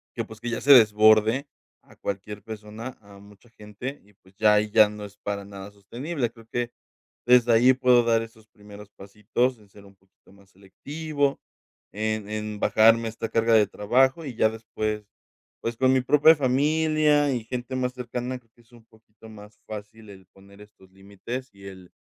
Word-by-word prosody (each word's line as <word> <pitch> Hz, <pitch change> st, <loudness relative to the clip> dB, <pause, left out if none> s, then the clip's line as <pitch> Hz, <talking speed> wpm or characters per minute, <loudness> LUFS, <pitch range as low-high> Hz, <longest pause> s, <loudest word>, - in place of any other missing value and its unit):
Que, -, -, -2 dB
pues, 110 Hz, 0 st, -13 dB
que 120 Hz, +1 st, -5 dB
ya 115 Hz, -, -3 dB
se 145 Hz, -, +3 dB
desborde 110 Hz, +2 st, +5 dB, 0.4 s
a -, -, -21 dB
cualquier 100 Hz, +1 st, -6 dB
persona, 110 Hz, +3 st, -9 dB
a 100 Hz, -1 st, -16 dB
mucha 100 Hz, +3 st, -19 dB
gente 115 Hz, +5 st, -9 dB
y, 105 Hz, -, -24 dB
pues, 95 Hz, 0 st, -26 dB
ya 105 Hz, +1 st, +4 dB
ahí 105 Hz, 0 st, +1 dB
ya 105 Hz, 0 st, +6 dB
no 105 Hz, 0 st, -8 dB
es 100 Hz, 0 st, -14 dB
para 100 Hz, -1 st, -5 dB
nada 100 Hz, 0 st, -10 dB
sostenible, 120 Hz, -, -5 dB
creo 115 Hz, -1 st, -18 dB
que, 120 Hz, 0 st, -3 dB, 0.5 s
desde 120 Hz, -1 st, +5 dB
ahí, 125 Hz, +3 st, +5 dB
puedo 125 Hz, -2 st, +3 dB
dar 115 Hz, -1 st, +2 dB
esos 110 Hz, -1 st, -12 dB
primeros 105 Hz, 0 st, -14 dB
pasitos 105 Hz, +6 st, -2 dB
en 105 Hz, -2 st, -22 dB
ser 100 Hz, 0 st, -17 dB
un 100 Hz, 0 st, -18 dB
poquito 95 Hz, 0 st, -28 dB
más 100 Hz, -1 st, -22 dB
selectivo 145 Hz, -, -4 dB, 0.5 s
en 110 Hz, 0 st, -3 dB
en 105 Hz, -1 st, -5 dB
bajarme 115 Hz, +2 st, +4 dB
esta 115 Hz, 0 st, -6 dB
carga 115 Hz, 0 st, +1 dB
de 110 Hz, -2 st, +5 dB
trabajo 130 Hz, +9 st, +1 dB
y 130 Hz, -4 st, -7 dB
ya 110 Hz, -, +3 dB
después, 110 Hz, -1 st, -5 dB, 0.5 s
pues, 115 Hz, 0 st, -3 dB
con 130 Hz, +1 st, +3 dB
mi 130 Hz, -, +2 dB
propia 150 Hz, +5 st, +5 dB
familia 150 Hz, +2 st, +2 dB
y 120 Hz, -3 st, -3 dB
gente 125 Hz, +2 st, -5 dB
más 125 Hz, -1 st, -2 dB
cercana, 125 Hz, 0 st, -5 dB
creo 115 Hz, -2 st, -36 dB
que 120 Hz, -, -23 dB
es 115 Hz, +1 st, -30 dB
un 115 Hz, -2 st, -18 dB
poquito 110 Hz, 0 st, -19 dB
más 105 Hz, -1 st, -14 dB
fácil 110 Hz, 0 st, -10 dB
el 95 Hz, -2 st, -14 dB
poner 100 Hz, +1 st, -19 dB
estos 100 Hz, -2 st, -19 dB
límites 100 Hz, +7 st, -8 dB
y 100 Hz, 0 st, -16 dB
el 95 Hz, -2 st, -13 dB
110 Hz, 190 wpm, -25 LUFS, 105-125 Hz, 0.5 s, ya